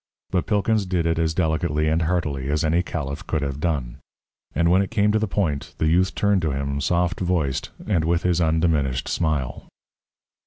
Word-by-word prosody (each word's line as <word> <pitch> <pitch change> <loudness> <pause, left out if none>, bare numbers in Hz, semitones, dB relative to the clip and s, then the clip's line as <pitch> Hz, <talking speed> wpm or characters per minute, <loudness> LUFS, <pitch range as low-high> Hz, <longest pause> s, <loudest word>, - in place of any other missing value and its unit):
But 90 - 0
Pilkins 105 -1 +1
did 90 -3 0
it 80 0 +1
as 80 -1 0
delicately 80 -2 +1
and 80 +2 +2
heartily 75 -5 -1
as 75 +3 +1
any 80 +2 +2
caliph 75 -5 -5
could 80 -3 -1
have 70 0 -3
done. 75 -8 -2 0.6
And 85 0 +3
when 95 +2 +5
it 100 - -2
came 105 -2 +2
to 110 - +2
the 110 - 0
point, 80 -9 -2
the - - 0
youth 90 +3 +2
turned 100 -2 +2
to 80 - 0
him, 70 0 -2
soft 90 +4 +1
voiced 85 -8 -1 0.2
and 90 -7 +1
with 85 +1 +1
his 90 -1 +2
undiminished 80 -6 +1
smile. 75 -7 -2
80 Hz, 190 wpm, -23 LUFS, 75-90 Hz, 0.6 s, when